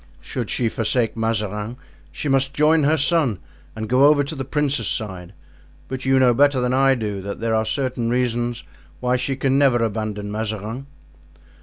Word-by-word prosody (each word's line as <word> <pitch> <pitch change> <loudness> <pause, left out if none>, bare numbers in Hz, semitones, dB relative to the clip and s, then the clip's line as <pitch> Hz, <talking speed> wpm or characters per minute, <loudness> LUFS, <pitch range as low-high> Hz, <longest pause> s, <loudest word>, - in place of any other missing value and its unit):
Should - - -5
she 120 - 0
forsake 115 +1 0
Mazarin 110 0 -2 0.3
she - - -5
must 135 0 +1
join 150 +1 +4
her 155 +2 +3
son 145 - +2 0.4
and 110 0 -4
go 130 +4 +4
over 145 -1 +5
to 140 - -5
the 135 -3 -4
princes' 145 +1 -1
side; 95 -5 -4 0.6
but 130 0 -5
you 135 0 +3
know 125 -2 +5
better 140 +1 +3
than 125 0 0
I 135 0 +4
do 105 -5 -4
that 100 +1 -6
there 115 0 -1
are 110 0 +1
certain 125 0 -1
reasons 120 -1 -1 0.4
why 125 0 +1
she 125 +2 -1
can 135 0 +1
never 130 -4 +3
abandon 105 -2 -3
Mazarin." 110 +4 -4
125 Hz, 175 wpm, -21 LUFS, 110-135 Hz, 0.6 s, over